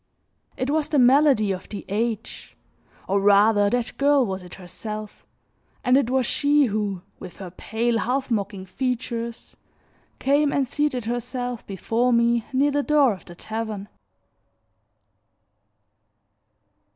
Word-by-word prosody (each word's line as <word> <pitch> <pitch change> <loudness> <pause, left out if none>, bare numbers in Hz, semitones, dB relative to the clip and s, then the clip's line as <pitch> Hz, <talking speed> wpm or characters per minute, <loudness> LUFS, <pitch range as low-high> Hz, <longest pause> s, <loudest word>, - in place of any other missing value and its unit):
It 260 +2 -1
was 305 -1 0
the 300 - +1
malady 260 -4 +5
of 185 -1 -6
the 205 - -7
age, 220 +2 -4 0.5
or 195 +1 +1
rather 205 +1 +5
that 245 +1 -2
girl 280 -2 +4
was 190 -2 -4
it 180 0 -11
herself; 210 +3 -8 0.6
and 250 0 +4
it 270 -3 +3
was 260 -1 +1
she 290 +2 +3
who, 205 -5 -2 0.2
with 180 - -10
her 185 -3 -8
pale, 230 +5 -1
half 260 +2 -1
mocking 200 -3 -2
features, 235 +2 -4 0.6
came 285 +1 +2
and 275 -2 +1
seated 290 -4 -1
herself 245 0 -3
before 225 +5 0
me 235 0 +3
near 275 +2 +2
the 290 +1 +1
door 285 -5 +3
of 185 - -12
the 175 - -12
tavern. 215 0 -5
235 Hz, 130 wpm, -24 LUFS, 205-265 Hz, 0.6 s, malady